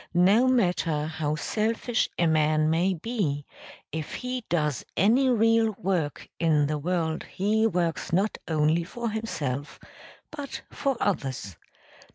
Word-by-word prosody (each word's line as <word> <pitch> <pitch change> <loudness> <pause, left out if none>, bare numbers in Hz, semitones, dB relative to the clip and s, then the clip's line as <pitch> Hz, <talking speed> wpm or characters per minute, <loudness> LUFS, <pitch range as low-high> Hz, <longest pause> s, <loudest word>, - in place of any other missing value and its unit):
No 200 +8 +5
matter 175 -10 +1
how 155 -1 -2
selfish 225 +7 0
a 170 - +2
man 155 -1 +3
may 180 +4 +2
be, 165 - -2 0.5
if 155 -2 -4
he 250 -1 -4
does 150 -6 0
any 240 +8 +4
real 225 -2 +3
work 175 -6 -2
in 155 -3 +3
the 150 +1 -1
world 160 0 -1
he 215 +3 +1
works 175 -3 -1
not 195 +5 +1
only 155 +1 +2
for 230 +6 -4
himself 145 - -4 0.5
but 290 -3 -6
for 275 -3 -1
others. 130 - -2
175 Hz, 130 wpm, -27 LUFS, 155-220 Hz, 0.5 s, No